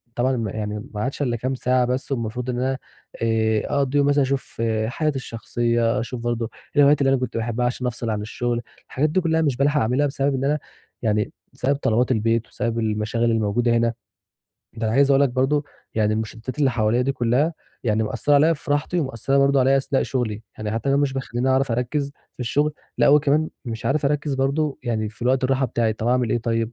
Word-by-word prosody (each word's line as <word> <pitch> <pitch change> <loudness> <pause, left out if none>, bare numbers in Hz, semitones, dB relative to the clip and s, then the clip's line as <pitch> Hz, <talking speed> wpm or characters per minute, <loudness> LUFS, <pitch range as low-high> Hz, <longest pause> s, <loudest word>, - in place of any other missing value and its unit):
طبعًا 130 +1 +1
م 115 -2 -2
يعني 105 +1 -4
ما 105 - -3
عادش 130 +5 -3
الّا 125 -4 +1
كام 130 +3 -2
ساعة 125 0 +2
بس 125 +3 -2
والمفروض 120 0 -2
إن 120 -1 -1
أنا 130 +1 0 0.4
آآ، 110 -1 +2
أقضّيهم 140 0 +2
مثلًا 145 0 +3
أشوف 135 -3 -2 0.3
حياتي 150 +5 -1
الشخصية، 120 -1 0
أشوف 120 0 -5
برضه 120 -1 -2 0.3
الهوايات 145 0 +5
اللي 135 - +4
أنا - - +3
كنت 125 -2 -3
باحبها 120 +2 -1
عشان 125 +1 -1
أفصِل 120 -1 -3
عن 105 -1 -1
الشغل، 120 +2 -2 0.3
الحاجات 150 +4 0
دي 185 +5 +1
كلّها 160 -1 +1
مش 140 -6 +1
بالحق 145 +2 +2
أعملها، 125 +6 +2
بسبب 140 0 0
إن 130 - -2
أنا 150 +2 +1 0.4
يعني 105 -2 0 0.2
بسبب 140 +3 0
طلبات 125 -2 +1
البيت، 115 0 +1
وبسبب 115 -1 -2
المشاغل 110 +1 0
الموجودة 115 +2 +1
هنا، 115 0 +1 0.8
ده 115 0 -2
أنا 110 - 0
عايز 140 +1 +4
أقول 135 0 +5
لك 140 - +4
برضه 135 +4 +1 0.3
يعني 110 -1 +2
المشتّتات 110 +4 -5
اللي 140 -3 +3
حواليّا 115 0 +1
دي 135 +2 0
كلّها 130 +6 +1 0.3
يعني 110 -1 +2
مأثّرة 145 +6 +1
عليَّ 155 +4 +5
في 145 - -8
راحتي 145 +5 +1
ومأثّرة 135 -1 0
برضه 140 0 +4
عليَّ 135 +2 +4
أثناء 135 0 +1
شغلي، 115 -5 -2 0.2
يعني 105 -1 -3
حتى 115 +2 -3
اللي 135 - +3
هو - - +3
مش 140 -2 0
بيخليني 130 -1 -2
أعرف 130 -1 +2
أركّز 140 +4 -1 0.2
في - - -13
الشغل، 145 +5 +1 0.3
لأ - - +5
وكمان 150 +2 +4 0.2
مش 115 -2 -5
عارف 145 +2 +1
أركّز 145 0 0
برضه 140 +2 0
يعني 110 -2 -1
في 110 - -12
الوقت 130 +2 +2
الراحة 130 0 +2
بتاعي 115 -1 0
طَب 110 +2 -3
أعمل 125 -2 +2
إيه 120 - +2
طيب؟ 115 0 -1
125 Hz, 210 wpm, -23 LUFS, 115-140 Hz, 0.8 s, الهوايات